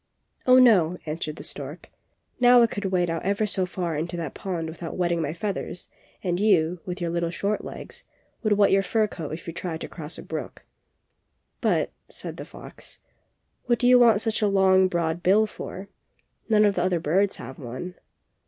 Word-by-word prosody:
'^Oh, 255 Hz, 0 st, +8 dB
no!" 185 Hz, -9 st, +5 dB
answered 155 Hz, -1 st, -4 dB
the -, -, -9 dB
stork. -, -, -7 dB, 0.5 s
^^Now 245 Hz, -1 st, +7 dB
I -, -, +7 dB
could 205 Hz, -2 st, -4 dB
wade 180 Hz, -3 st, +1 dB
out 165 Hz, -, -2 dB
ever 200 Hz, +3 st, 0 dB
so 190 Hz, -3 st, +1 dB
far 175 Hz, -3 st, -3 dB
into 170 Hz, +4 st, -3 dB
that 165 Hz, -5 st, -4 dB
pond 175 Hz, -4 st, -4 dB
without 160 Hz, +1 st, -7 dB
wetting 175 Hz, -2 st, +1 dB
my 145 Hz, -, -1 dB
feathers, 180 Hz, +1 st, -4 dB, 0.3 s
and 175 Hz, -2 st, 0 dB
you, 180 Hz, -5 st, +3 dB
with 180 Hz, 0 st, -4 dB
your 170 Hz, -2 st, -2 dB
little 170 Hz, 0 st, -1 dB
short 200 Hz, +5 st, -2 dB
legs, -, -, -9 dB, 0.4 s
would 215 Hz, -2 st, +2 dB
wet 200 Hz, -1 st, +4 dB
your 195 Hz, -, +5 dB
fur 215 Hz, +3 st, +1 dB
coat 165 Hz, -8 st, -6 dB
if 165 Hz, -, -7 dB
you 165 Hz, -, -6 dB
tried 170 Hz, -1 st, -5 dB
to -, -, -4 dB
cross 155 Hz, -1 st, -7 dB
a -, -, -8 dB
brook." -, -, -6 dB, 1.0 s
^^But," -, -, +1 dB, 0.2 s
said -, -, -6 dB
the -, -, -7 dB
fox, -, -, -8 dB, 0.7 s
"what 240 Hz, -1 st, +2 dB
do 245 Hz, -, +1 dB
you 250 Hz, 0 st, +7 dB
want 225 Hz, -4 st, +5 dB
such 225 Hz, -1 st, 0 dB
a 210 Hz, -, +3 dB
long, 190 Hz, -1 st, +4 dB
broad 170 Hz, -1 st, -1 dB
bill 205 Hz, +5 st, +4 dB
for? 195 Hz, -2 st, -8 dB, 0.6 s
None 215 Hz, -1 st, +5 dB
of 205 Hz, -, +3 dB
the 180 Hz, -, -1 dB
other 180 Hz, -1 st, +1 dB
birds 190 Hz, +6 st, +1 dB
have 130 Hz, -, -9 dB
one." 130 Hz, +8 st, -6 dB
180 Hz, 195 wpm, -25 LUFS, 170-205 Hz, 1.0 s, ^Oh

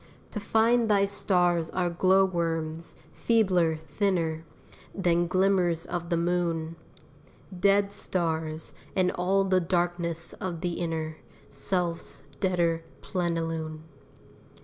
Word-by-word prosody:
To 210 Hz, -, -4 dB
find 225 Hz, +2 st, +3 dB
thy 200 Hz, -1 st, +4 dB
stars 175 Hz, -4 st, +1 dB
are 180 Hz, -2 st, -1 dB
glow 190 Hz, +2 st, +4 dB
worms, 165 Hz, -2 st, -3 dB, 0.2 s
feebler, 185 Hz, -8 st, +2 dB
thinner 160 Hz, 0 st, -1 dB, 0.5 s
Than 175 Hz, -2 st, +2 dB
glimmers 185 Hz, -2 st, +2 dB
of 170 Hz, -1 st, -4 dB
the 170 Hz, -, +1 dB
moon: 170 Hz, -1 st, 0 dB, 0.8 s
Dead 200 Hz, +1 st, +3 dB
stars, 160 Hz, -5 st, -2 dB, 0.2 s
and 185 Hz, -1 st, +3 dB
all 190 Hz, +2 st, +1 dB
the 190 Hz, -1 st, +3 dB
darkness 175 Hz, -1 st, -1 dB
of 175 Hz, -3 st, -5 dB
the 175 Hz, -1 st, -1 dB
inner 160 Hz, -2 st, -3 dB, 0.3 s
Self's 170 Hz, +4 st, -3 dB, 0.2 s
deader 170 Hz, -3 st, +1 dB, 0.2 s
plenilune. 165 Hz, -3 st, -2 dB
175 Hz, 105 wpm, -27 LUFS, 165-190 Hz, 0.8 s, thy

